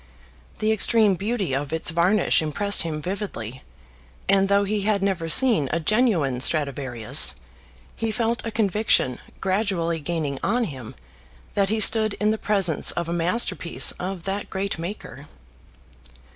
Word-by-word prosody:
The 215 0 0
extreme 220 -1 +3
beauty 200 - -3
of 140 +1 -3
its 160 0 +1
varnish 175 +4 +2
impressed 200 +6 +1
him 155 -2 -4
vividly, 140 - -6 0.7
and 195 0 +2
though 200 0 +3
he 205 +1 -2
had 200 -1 -1
never 180 -5 -2
seen 220 - +6
a 170 - -1
genuine 170 - 0
Stradivarius, 135 -4 +1 0.6
he 225 - -3
felt 230 +1 -2
a 230 - -4
conviction 210 - +1 0.2
gradually 185 -4 -1
gaining 150 -3 -4
on 240 +4 0
him 130 - -8 0.6
that 195 -1 0
he 220 +1 0
stood 215 -1 +4
in 210 +1 0
the 220 - -3
presence 195 -7 +2
of 170 -1 0
a 170 - -3
masterpiece 175 0 +1
of 185 -1 -5
that 195 +2 -5
great 195 -2 -4
maker. 165 -5 -8
190 Hz, 145 wpm, -23 LUFS, 160-210 Hz, 0.7 s, seen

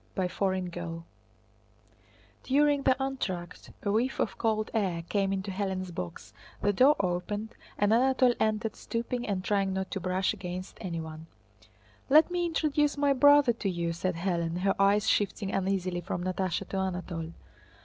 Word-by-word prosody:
CHAPTER 190 +1 0
X 180 -2 -4 1.6
During 285 +1 +3
the 265 -1 +3
entr'acte 190 -11 -4
a 200 - 0
whiff 240 +5 0
of - - 0
cold 215 -2 0
air 185 -7 0
came 195 -2 0
into 195 0 -2
Hélène's 190 -1 -3
box, 90 - -7 0.3
the 205 - +1
door 265 +9 +6
opened, 200 +4 -2 0.2
and 205 +1 +3
Anatole 255 +1 +4
entered, 215 0 0
stooping 240 +1 -3
and 195 -3 -1
trying 195 -1 +1
not 190 0 -3
to 195 - -2
brush 185 +2 0
against 185 -2 -7
anyone. 165 -4 -6 0.8
"Let 310 +5 +6
me 350 -1 0
introduce 300 -3 +1
my 285 -1 +3
brother 285 -1 +6
to 215 -3 -2
you," 170 -2 -2
said 185 +1 -2
Hélène, 170 -1 -1
her 195 +1 +3
eyes 200 +2 +4
shifting 200 -1 +1
uneasily 185 -2 -1
from 175 0 -4
Natásha 185 0 -2
to 195 - -3
Anatole. 175 -3 -3
195 Hz, 150 wpm, -29 LUFS, 180-235 Hz, 1.6 s, door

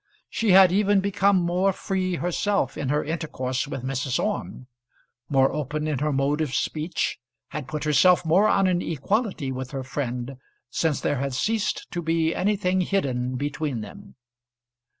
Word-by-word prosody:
She 225 - 0
had 190 -1 +8
even 200 +1 +3
become 200 0 +2
more 180 +2 +2
free 185 -1 -2
herself 175 -3 0
in 135 - -3
her 150 +1 +1
intercourse 145 -4 -3
with 135 -3 -5
Mrs. 130 0 -1
Orme, 205 -10 -3 0.6
more 135 -1 +3
open 150 +1 -3
in 150 -4 -1
her 150 +1 0
mode 140 +2 +1
of 145 -4 -2
speech, 155 -2 -2 0.3
had 150 -3 -6
put 150 +2 -4
herself 175 +4 +4
more 185 +7 +4
on 195 - +3
an 180 -1 +2
equality 170 - -1
with 130 0 -5
her 135 -1 -5
friend, 130 -1 -4 0.3
since 160 -3 0
there 145 - 0
had 135 -1 -2
ceased 210 - -1
to 175 - -3
be 165 0 +1
anything 190 -1 +1
hidden 130 -10 -1
between 145 -2 -2
them. 200 - -11
155 Hz, 160 wpm, -25 LUFS, 135-190 Hz, 0.6 s, had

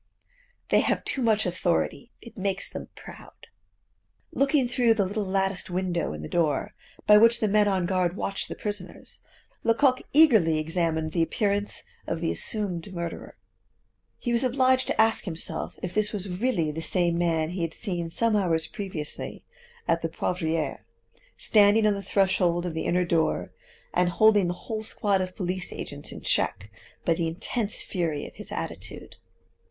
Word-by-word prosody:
They - - +5
have - - 0
too 270 - +1
much 220 -3 +2
authority; 180 +6 -1
it 235 - -12
makes 195 -1 0
them - - -6
proud." - - -13 0.9
Looking 275 -1 +2
through 240 -2 +3
the 200 -3 +2
little 205 +3 -2
latticed 195 0 0
window 180 - -1
in 75 0 -7
the - - -5
door, 155 -5 0 0.3
by 210 - +8
which 230 +2 +5
the 215 - +1
men 210 0 +3
on 190 -3 +1
guard 180 -1 0
watch 195 -1 -3
the - - -6
prisoners, 205 -3 -6 0.4
Lecoq 255 +3 +3
eagerly 220 - +5
examined 160 0 -1
the 170 - 0
appearance 205 +4 0 0.2
of 165 - -2
the 165 0 0
assumed 200 -4 -2
murderer. 170 -2 -6 0.8
He 240 - -2
was 235 +2 +2
obliged 260 0 +3
to - - -2
ask 225 0 +3
himself 165 -2 -4
if 180 - -3
this 215 -1 +1
was 205 -2 -3
really 180 -5 0
the 160 +2 -5
same 175 0 +1
man 165 -2 +1
he 180 0 -4
had 165 -1 -2
seen 175 -5 -3
some 230 +6 +1
hours 165 -5 +1
previously 165 -4 -5 0.4
at 165 - +2
the 165 - -2
Poivriere, 165 -1 -2 0.5
standing 210 0 +4
on 210 - +4
the 200 - -4
threshold 180 -3 +1
of 175 - -3
the 160 - -3
inner 180 +1 +2
door, 165 -2 0 0.4
and 180 0 +2
holding 205 0 +4
the 175 - -1
whole 220 -2 -3
squad 205 -2 0
of 185 0 -4
police 180 0 -3
agents 145 0 -6
in - - -8
check 100 +3 0 0.3
by 170 - +4
the 165 0 -1
intense 200 +6 0
fury 165 -6 -2
of - - -10
his - - -9
attitude. - - -6
185 Hz, 170 wpm, -26 LUFS, 170-215 Hz, 0.9 s, by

